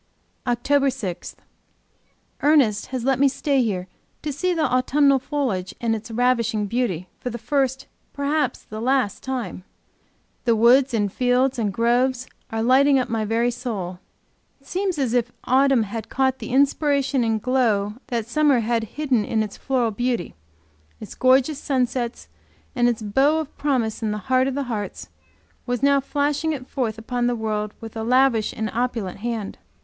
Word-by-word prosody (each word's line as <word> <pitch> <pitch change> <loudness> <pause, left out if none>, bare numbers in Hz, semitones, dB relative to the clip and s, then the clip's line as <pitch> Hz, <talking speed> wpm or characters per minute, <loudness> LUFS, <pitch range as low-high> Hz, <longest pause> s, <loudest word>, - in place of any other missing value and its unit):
OCTOBER 275 +4 +2
6. 210 -10 -5 1.1
Ernest 280 -8 +3
has 255 -2 -4
let 265 0 +1
me 280 - +5
stay 275 0 +1
here 190 -6 -2 0.4
to 300 -2 -2
see 365 +6 0
the 330 -3 0
autumnal 275 +2 +3
foliage 250 -10 -2
in 230 -1 0
its 225 +2 -5
ravishing 230 -2 +1
beauty 200 -6 -2
for 250 - -4
the 235 - -5
first, 265 +2 -1 0.3
perhaps 285 -2 -1
for - - -35
the 215 0 -5
last, 255 -4 +1
time. 245 -9 -4 0.8
The 235 -2 +4
woods 245 +3 +5
and 205 -3 0
fields 250 +1 +1
and 210 -3 0
groves 245 +4 +1 0.2
are 225 0 -2
lighting 270 +3 +5
up 255 - 0
my 225 -1 -1
very 230 +3 +1
soul! 210 -8 -5 0.6
It 275 - -28
seems 375 +2 -2
as 260 -5 0
if 245 -1 +1
autumn 265 -2 +3
had 220 +1 -6
caught 265 0 +1
the - - -7
inspiration 280 -1 +2
and 225 -1 +1
the - - -26
glow 225 -6 +1 0.2
of 235 -3 -1
summer, 280 0 +3
had 230 0 0
hidden 265 -7 +1
its 215 -1 -1
floral 250 -4 0
beauty, 240 -2 -2 0.7
its - - -9
gorgeous 265 +3 +3
sunsets 250 -4 -2 0.5
and 240 -1 +3
its 230 -2 -2
bow 270 +9 +3
of 315 -2 -4
promise 250 -7 -1
in 220 -2 -1
its 210 - -7
heart 260 0 +2
of 270 - -2
hearts, 240 -7 -4
and - - -33 0.5
was 245 +1 -2
now 280 0 +5
flashing 290 +3 -1
it 260 -4 -6
forth 225 -5 -2
upon 240 +2 -2
the 245 - +1
world 215 -2 -3
with 225 -1 -9
a 220 - -3
lavish 250 -2 +3
and 220 - -3
opulent 230 -6 -2
hand. 225 -2 -4
245 Hz, 170 wpm, -23 LUFS, 225-270 Hz, 1.1 s, me